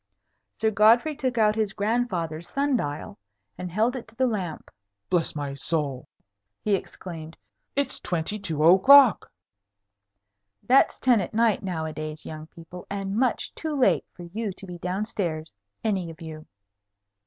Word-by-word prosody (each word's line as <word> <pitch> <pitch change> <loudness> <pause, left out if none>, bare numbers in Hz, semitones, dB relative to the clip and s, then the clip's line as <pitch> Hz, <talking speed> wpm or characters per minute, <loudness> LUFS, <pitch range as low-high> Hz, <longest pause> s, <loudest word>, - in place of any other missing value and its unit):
Sir 220 0 +2
Godfrey 230 +8 +4
took 255 -3 -2
out 215 -1 +4
his 215 -3 0
grandfather's 190 -8 -1
sun 280 0 +1
dial, 145 -10 -4 0.4
and 180 - -6
held 225 +7 +1
it 250 - -6
to 225 - -18
the 260 +2 +2
lamp. 190 -9 -3 0.4
"Bless 175 -3 +1
my 145 -2 -3
soul," 140 -2 -3 0.6
he 210 - +1
exclaimed; 165 -4 -5 0.4
"it's 280 0 -1
twenty 175 +5 -2
two 160 -6 -2
o'clock." 225 - +7 1.3
(That's 265 +2 +4
ten 245 -5 +4
at 185 - -6
night 225 -2 +3
nowadays, 155 -4 -4
young 155 0 -8
people, 170 +2 -12
and 195 0 -3
much 245 +1 0
too 315 -2 -4
late 255 - +3
for 175 - -11
you 205 +5 -4
to 195 - -11
be 175 -2 -8
down 185 +4 -2
stairs, 160 - -3 0.3
any 195 -6 -1
of 165 - -11
you.) 155 -2 -9
195 Hz, 150 wpm, -26 LUFS, 160-225 Hz, 1.3 s, o'clock